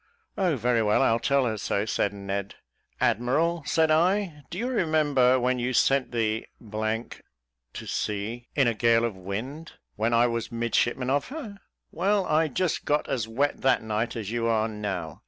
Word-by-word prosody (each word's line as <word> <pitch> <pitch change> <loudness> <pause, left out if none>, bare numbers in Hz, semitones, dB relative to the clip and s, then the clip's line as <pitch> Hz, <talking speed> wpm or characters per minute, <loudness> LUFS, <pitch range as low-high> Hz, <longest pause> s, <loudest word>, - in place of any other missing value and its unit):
"Oh, 180 -5 +1
very 120 -1 +1
well, 105 -1 +3
I'll 115 +1 +3
tell 140 0 +2
her 110 -3 -2
so," 100 +1 -1
said 100 -2 0
Ned. 100 0 -4 0.4
"Admiral," 155 - +1
said 160 -1 +3
I, 175 0 +2
"do 175 - -6
you 235 +5 -1
remember 150 - +3
when 125 +1 +1
you 125 +1 -1
sent 135 +2 +2
the 110 -2 -1 0.5
to - - -12
sea 110 +4 -3
in 140 -4 +4
a 120 - +2
gale 115 +1 +3
of 115 -4 -3
wind, 115 - -6 0.2
when 110 +2 +1
I 115 +1 +4
was 115 -1 -2
midshipman 120 +2 0
of 140 +1 +1
her? 245 -9 -7 0.3
Well, 200 0 +1
I 160 0 +2
got 140 - -13
just 180 -3 -1 0.2
as 115 -5 -1
wet 140 +6 -1
that 130 -3 +3
night 110 +2 -2
as 110 -3 -4
you 115 -1 0
are 110 -1 +2
now. 100 -7 -5
120 Hz, 175 wpm, -26 LUFS, 110-150 Hz, 0.5 s, in